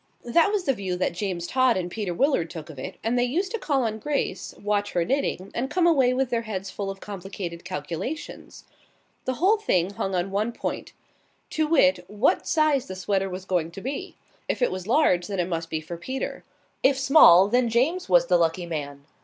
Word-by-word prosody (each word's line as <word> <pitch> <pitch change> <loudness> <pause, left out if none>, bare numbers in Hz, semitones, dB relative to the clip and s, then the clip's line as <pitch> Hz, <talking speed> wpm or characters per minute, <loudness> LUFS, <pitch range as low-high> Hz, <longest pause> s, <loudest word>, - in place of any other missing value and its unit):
That 330 +11 +3
was 415 -3 0
the 270 - +2
view 190 -5 -3
that 180 - -1
James 180 -2 -3
Todd 255 +2 +2
and 180 -1 -3
Peter 205 -3 -3
Willard 175 - +1
took 160 -2 -8
of 140 - -11
it, - - -6
and 235 +3 +1
they - - +3
used 350 +11 -1
to 460 - -3
call 280 -8 0
on 220 -1 -2
Grace, 280 -8 -3
watch 205 0 -1
her 175 -1 +1
knitting, 250 -7 -1
and 255 +3 -2
come 350 +3 +1
away 270 -7 +4
with 255 0 0
their 235 -1 +1
heads 195 -4 -5
full 200 0 -4
of 195 0 -6
complicated 190 -4 -7
calculations. 175 - -6 0.6
The 260 - -1
whole 380 - +3
thing 185 - +1
hung 195 -1 -3
on 180 +2 -1
one 215 +4 -1
point - - -5 0.6
to 310 -1 0
wit, 185 - +3
what 210 +5 +1
size 310 -5 +2
the 185 - -6
sweater 195 +1 -1
was 185 +1 -7
going 175 -4 0
to 170 +3 -10
be. 285 - -5 0.3
If - - 0
it 245 - +2
was 185 0 -5
large, 220 - +3
then 200 -2 -3
it 175 - 0
must 165 -2 -3
be 160 - -2
for 170 +2 -7
Peter; 260 +10 -5 0.4
if 265 0 +4
small, 265 - +7
then 245 +2 +2
James 265 - +1
was 175 -1 +5
the 175 0 +3
lucky 170 +1 +1
man. 145 -4 -5
205 Hz, 210 wpm, -25 LUFS, 180-265 Hz, 0.6 s, small